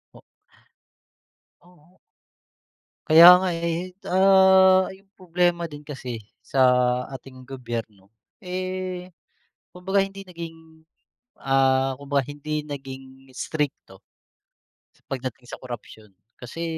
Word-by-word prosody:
O - - -15 1.4
Oo. 175 0 -24 1.1
Kaya 165 0 +9 0.2
nga, 190 - 0
eh, 170 +2 -4
ah, 190 0 +6
yung 195 0 -27
problema 175 -1 0
din 145 0 -9
kasi, 130 -6 -7 0.2
sa 135 - -2 0.6
ating 130 -1 -12
gobyerno, 115 -6 -7 0.3
eh, 185 0 -5 0.6
kumbaga 190 +2 0
hindi 195 0 -7
naging, 165 -2 -11 0.6
ah, 135 -1 +2
kumbaga 140 -1 -2
hindi 150 +1 -4
naging 135 -2 -10
strikto 150 +1 -4 1.1
pagdating 130 -2 -5
sa 120 - -10
korapsyon, 110 -5 -10 0.2
kasi 125 +7 -7
155 Hz, 95 wpm, -24 LUFS, 130-180 Hz, 1.4 s, Kaya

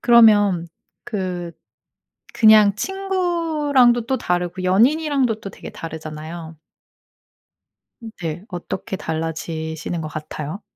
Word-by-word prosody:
그러면 205 -7 +5 0.4
그 180 -5 -4 0.8
그냥 215 -3 +6
친구랑도 325 - +1
또 265 0 +1
다르고 180 +1 -2
연인이랑도 255 +3 +2
또 195 - -7
되게 - - -10
다르잖아요. 160 0 -8 1.6
네. 165 +1 -4
어떻게 185 +1 -5
달라지시는 160 0 -4
것 155 - -4
같아요? 155 +4 -6
190 Hz, 225 characters per minute, -21 LUFS, 165-240 Hz, 1.6 s, 그냥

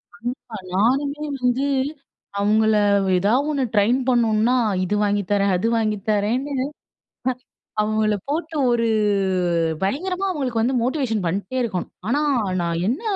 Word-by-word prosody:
கண்டிப்பா, 240 -1 -6 0.2
நானுமே 275 +9 +1 0.2
வந்து 250 +2 +1 0.7
அவுங்கள 215 +2 +3 0.4
ஏதா 200 +5 +2 0.2
ஒண்ணு 285 -3 0
ட்ரெயின் 220 +5 +3
பண்ணணுனா 230 -1 +3 0.3
இது 185 +3 -1
வாங்கி 205 0 +1
தரேன், 200 -1 +3
அது 185 +6 0
வாங்கி 215 -2 0
தரேன்னு. 235 +7 0 1.3
அவங்கள 215 0 +1
போட்டு 320 +2 -2
ஒரு 235 -1 +2 1.0
பயங்கரமா 365 - -1
அவங்களுக்கு 260 -9 -1
வந்து 255 +3 +1
மோட்டிவேஷன் 245 -6 -1
பண்ணிட்டே 200 +8 -2
இருக்கணும். 190 -7 -3 0.2
ஆனா, 285 +6 +1 0.4
நான் 170 0 -1
என்ன 260 - -1
230 Hz, 120 wpm, -22 LUFS, 210-265 Hz, 1.3 s, அவுங்கள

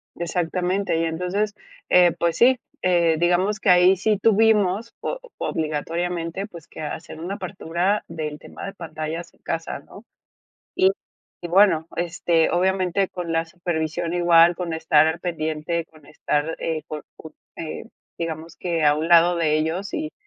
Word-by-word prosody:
Exactamente. 180 +2 -1
Y 165 - +1
entonces, 180 +6 -1 0.4
eh, 180 -1 +6
pues 170 -1 0
sí, 250 +1 +5 0.2
eh, 170 -3 +3
digamos 180 +4 +2
que - - 0
ahí 180 +1 +6
sí 210 +3 +1
tuvimos, 220 0 +3
o - - -3 0.2
obligatoriamente, 165 +4 -2
pues, 170 -6 -12
que - - -10
hacer 155 +1 -6
una 180 +5 -4
apertura 185 0 -1
del 155 -2 -5
tema - - -10
de 195 - -6
pantallas 160 -1 -6
en - - -30
casa, 165 -3 -4
¿no? 200 +9 -15 0.7
Y 375 +1 +4 0.5
y 175 - -5
bueno, 175 -3 +4
este, 170 -1 +1
obviamente 185 +1 +1
con 175 -2 -6
la 165 0 +1
supervisión 165 -1 -3
igual, 175 -1 +5
con 175 -2 -4
estar 160 -1 +4
al 160 +1 -1
pendiente, 160 -1 -2
con 155 -2 -21
estar, 150 +1 -2
eh, 160 -2 -2
por 155 -1 -6
por, 160 - -11 0.2
eh, 160 +5 -6 0.3
digamos 165 0 -5
que 170 -2 -2
a 150 0 +5
un 155 +1 -2
lado 170 +1 +6
de 155 -2 +2
ellos, 165 +6 -2
y 310 0 -3
170 Hz, 155 wpm, -23 LUFS, 160-185 Hz, 0.7 s, eh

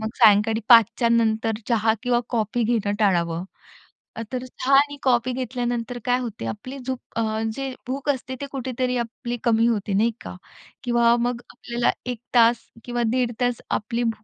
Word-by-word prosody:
मग 220 - -2
सायंकाळी 220 +1 +5
5 230 0 +6
नंतर 225 -1 +2 0.2
चहा 220 -1 +2
किंवा 245 -1 +2
कॉफी 230 0 0
घेणं 215 -3 0
टाळावं. 170 -4 +1 0.9
तर 255 0 -3
चहा 255 +2 +1
आणि 285 +1 +3
कॉफी 250 -1 +2
घेतल्यानंतर 245 -1 -3
काय 245 0 +2
होते, 235 -4 -5
आपली 255 +6 -6
झोप 260 0 -4 0.2
अ, 220 -1 -1
जे 270 -1 -4
भूक 275 +2 -3
असते 260 -1 -5
ते 280 - -2
कुठेतरी 255 -1 -2
आपली 240 +1 -4
कमी 230 0 +3
होते 210 -3 -1
नाही 225 +4 +3
का? - - -8 0.5
किंवा 235 -1 +3
मग 245 0 -1
आपल्याला 240 0 -1 0.2
1 240 - -6 0.2
तास 235 0 +5 0.2
किंवा 240 -1 -1
दीड 250 -2 +1
तास 245 -1 0
आपली 230 +3 -1
भूक 225 -2 -2
235 Hz, 165 wpm, -23 LUFS, 225-250 Hz, 0.9 s, 5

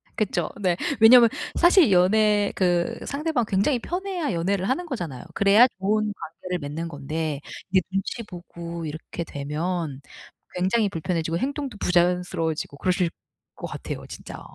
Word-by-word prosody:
그쵸. 180 -6 -1
네. 180 -3 +2 0.2
왜냐하면 235 +1 +8 0.3
사실 345 - +5
연애 205 +3 +4
그 180 +4 +1
상대방 285 -4 -1
굉장히 205 +7 +2
편해야 360 - -3
연애를 185 +3 0
하는 290 +8 0
거잖아요. 175 - -5
그래야 200 +5 +6
좋은 215 +2 +1
관계를 180 0 -6
맺는 155 +3 -4
건데 150 0 -4 0.3
이제 190 -1 +4
눈치 195 +5 -2
보고 170 -3 -8
이렇게 160 +2 -6
되면 150 0 -3 0.5
굉장히 200 +4 +2
불편해지고 165 -1 -2
행동도 275 -1 -3
부자연스러워지고 175 -4 0
그러실 180 -1 +1 0.5
것 - - -6
같아요 - - -6
진짜. - - -9
185 Hz, 335 characters per minute, -24 LUFS, 165-220 Hz, 0.5 s, 왜냐하면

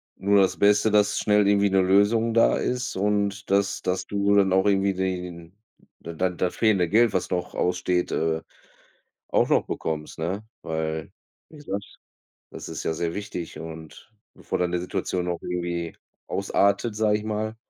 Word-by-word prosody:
nur 100 0 +3
das 95 - +1
Beste, 105 +2 +4
dass 105 -1 +3
schnell 105 -1 +3
irgendwie 100 0 +3
'ne 95 0 +3
Lösung 100 +5 +3
da 115 - +4
ist. 125 0 -2
Und 100 0 -1
dass 100 0 +1
dass 90 0 -2
du 100 0 +1
dann 95 -2 +4
auch 95 +1 +3
irgendwie 100 -1 +2
die 95 -1 -2
den 85 +1 -10 0.4
da 85 - -8
dann 90 +1 -1
das 90 - -1
fehlende 100 -7 +2
Geld, 115 +2 +4
was 95 - -1
noch 90 -1 -3
aussteht, 90 0 0
äh, 80 0 0 0.9
auch - - +2
noch - - +2
bekommst, 75 0 -4
ne? 90 +6 -2 0.2
Weil, 80 -1 -3 0.4
wie 155 - -14
gesagt, 100 -9 -6 0.5
das - - -8
ist - - -5
ja - - 0
sehr 85 +1 -2
wichtig 95 -4 -6
und 80 +5 -10 0.2
bevor - - -4
dann 90 -1 0
die 90 - +1
Situation 90 0 -2
noch 85 -1 -2
irgendwie 85 -1 -3 0.3
ausartet, 100 +3 +1
sage 105 -1 +2
ich 105 - -8
mal. 110 +1 -3
95 Hz, 175 wpm, -25 LUFS, 90-105 Hz, 0.9 s, Beste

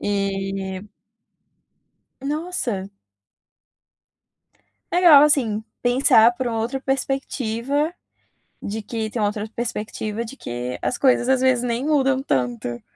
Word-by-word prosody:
E 195 -1 -2 1.4
Nossa. 280 - -3 2.0
Legal, 335 -5 +8
assim, 225 -8 +1 0.2
pensar 245 -2 +5
por 260 - -2
uma 225 -1 -1
outra 250 +4 -2
perspectiva, 270 +2 -1 0.7
de 215 +1 -4
que 220 0 -4
tem 230 - -3
uma 205 - +3
outra 210 +1 -4
perspectiva 220 -1 -4
de 260 +5 -9
que 120 - -5
as 250 - -1
coisas, 255 -2 +3
às 265 -1 +3
vezes, 255 -2 +3
nem 240 +2 -1
mudam 270 -3 +2
tanto. 120 - -2
235 Hz, 110 wpm, -22 LUFS, 205-270 Hz, 2.0 s, Legal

